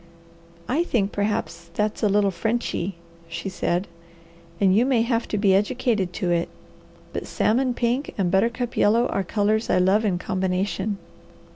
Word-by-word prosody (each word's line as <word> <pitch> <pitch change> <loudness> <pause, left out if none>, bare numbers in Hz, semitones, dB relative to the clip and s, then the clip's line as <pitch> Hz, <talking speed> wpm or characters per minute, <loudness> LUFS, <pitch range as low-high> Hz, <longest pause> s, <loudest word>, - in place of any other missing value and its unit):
"I 300 +7 +1
think 210 - 0
perhaps 200 -4 -2
that's 210 0 -1
a 210 - +3
little 200 0 +3
Frenchy," 200 -1 -2 0.3
she 170 +3 -4
said, 180 0 -1 0.7
"and 195 -2 +4
you 225 - +5
may 250 -3 +2
have 230 -1 0
to 210 - -2
be 200 -2 +4
educated 210 -2 +1
to 180 -2 -1
it; 170 0 +1 0.6
but - - -4
salmon 250 +2 +1
pink 245 +4 -1
and 185 -4 +1
buttercup 230 +5 +1
yellow 230 +4 +4
are 195 - 0
colours 215 +4 0
I - - +3
love 190 +4 +3
in 195 -5 +1
combination." 190 +2 -1
205 Hz, 155 wpm, -24 LUFS, 190-230 Hz, 0.7 s, you